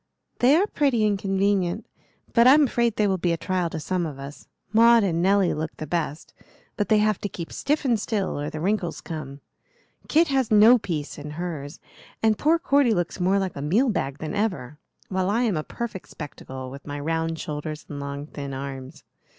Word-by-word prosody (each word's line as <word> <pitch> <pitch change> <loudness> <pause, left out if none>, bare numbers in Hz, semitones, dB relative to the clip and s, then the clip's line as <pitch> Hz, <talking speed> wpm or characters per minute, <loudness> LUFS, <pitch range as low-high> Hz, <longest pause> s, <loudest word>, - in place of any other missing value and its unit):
"They 255 +4 +5
are 370 +5 +4
pretty 275 - +1
and 210 -1 +2
convenient, 195 0 0 0.5
but 235 +1 +6
I'm 295 +4 +7
afraid 235 -4 +1
they 210 - +2
will 190 -2 +1
be 170 0 +1
a - - -1
trial 180 -1 -1
to 160 - -5
some 175 +2 -1
of 145 -3 -8
us. 140 +1 -10 0.3
Maud 230 0 +6
and 170 -4 0
Nelly 195 0 +3
look 155 +1 -4
the 155 - -5
best, 155 -1 -3 0.4
but 205 - -1
they 215 - +5
have 210 -1 +2
to 205 - -3
keep 170 -2 -7
stiff 295 +1 -1
and 235 -4 +2
still, 205 -7 -2
or 145 +1 -3
the 155 - -6
wrinkles 185 0 -1
come. 145 -4 -7 0.7
Kit 325 +1 +3
has 265 -4 +1
no 220 +3 +7
peace 155 -9 -4
in 145 +1 -7
hers, 160 -4 -5 0.4
and 220 -1 +4
poor 315 +8 +3
Cordy 280 - +3
looks 175 +1 -2
more 185 +2 +2
like 190 -3 -2
a 140 - -5
meal 205 - +2
bag 140 -9 -2
than 155 +3 -5
ever, 150 - -2 0.3
while 185 0 0
I 230 +4 +2
am 220 -6 +1
a 155 - -2
perfect 220 -2 -6
spectacle, 130 -3 -8
with 140 +2 -11
my 145 0 -4
round 165 +2 -1
shoulders 150 0 -5
and 145 - -7
long 140 0 -5
thin 140 -2 -7
arms. 135 -1 -7
185 Hz, 205 wpm, -24 LUFS, 150-220 Hz, 0.7 s, I'm